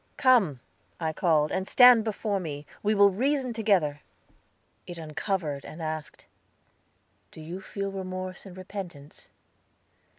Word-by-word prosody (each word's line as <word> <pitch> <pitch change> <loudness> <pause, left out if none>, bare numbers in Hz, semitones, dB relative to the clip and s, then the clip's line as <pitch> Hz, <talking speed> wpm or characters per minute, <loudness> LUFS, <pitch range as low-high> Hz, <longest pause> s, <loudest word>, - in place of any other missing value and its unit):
"Come," 210 - +3 0.4
I 160 -2 -2
called, 155 -3 +2
"and 190 - -2
stand 245 -3 +7
before 210 -2 -2
me; 150 -4 -6 0.2
we 215 +1 +1
will 200 0 +6
reason 260 +4 0
together." 190 -10 +1 0.9
It 175 - -7
uncovered, 160 -2 -3
and 160 - -10
asked: 155 -1 -6 1.0
"Do - - -14
you 170 +4 -7
feel 195 0 -4
remorse 185 0 -6
and 185 -1 -12
repentance?" 180 -6 -9
185 Hz, 125 wpm, -27 LUFS, 155-205 Hz, 1.0 s, stand